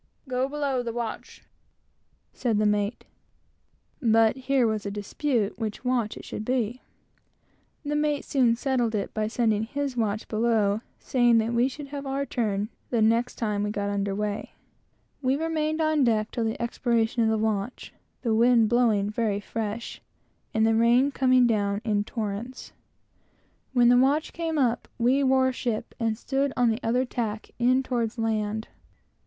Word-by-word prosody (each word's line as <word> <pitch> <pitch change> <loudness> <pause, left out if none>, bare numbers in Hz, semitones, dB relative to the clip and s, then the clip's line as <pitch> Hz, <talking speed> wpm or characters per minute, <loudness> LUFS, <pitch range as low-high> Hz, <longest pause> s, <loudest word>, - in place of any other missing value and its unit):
"Go 255 +1 -1
below 280 -3 -1
the 235 -1 -4
watch," 235 -1 -6 0.9
said 230 -4 0
the 215 - +2
mate; 210 +1 0 1.0
but 225 -2 +4
here 265 -1 +1
was 215 -2 0
a 200 - -3
dispute 210 +1 -2
which 220 +2 -4
watch 245 -4 0
it - - -10
should - - -5
be, 245 0 -1 1.0
which 290 - -5
the - - +1
mate 295 -1 0
soon 245 -4 +3
however - - -17
settled 235 -6 -1
by 215 0 -1
sending 220 -2 +1
his 280 +2 -3
watch 215 -2 -1
below, 215 -2 +1 0.2
saying 240 -2 +3
that 225 +1 +1
we 240 +2 +3
should 280 +1 -8
have 280 -1 -6
our 275 +1 -1
turn 210 -5 -1 0.2
the 235 - 0
next 230 +3 +2
time 210 -3 -1
we 205 - -1
got 205 -1 -2
under 200 -1 -1
weigh. 210 0 -3 0.7
We 260 0 +2
remained 315 0 -1
on 310 -2 +2
deck 220 -3 +1
till 235 -3 -1
the 220 - -2
expiration 235 -1 0
of 225 - +3
the 220 - +1
watch, 215 +1 -2 0.3
the 230 -3 +1
wind 230 -1 +4
blowing 225 -4 +3
very 215 -2 0
fresh 220 +2 -5 0.5
and 220 0 +2
the 225 - +3
rain 240 +5 +4
coming 255 -2 +4
down 205 -3 +1
in 210 -2 0
torrents. 225 +4 -5 1.0
When 240 -2 +5
the 245 - +6
watch 285 +4 +2
came 330 -2 -2
up, 245 -4 +1
we 255 +4 +3
wore 260 0 +3
ship, 235 -3 -3
and 225 -2 0
stood 275 +3 -1
on 245 -2 +4
the 220 - -2
other 250 +3 +1
tack, 220 -4 -4
in 255 +2 +3
towards 240 -2 -2
land. 220 -1 -1
235 Hz, 165 wpm, -26 LUFS, 215-255 Hz, 1.0 s, the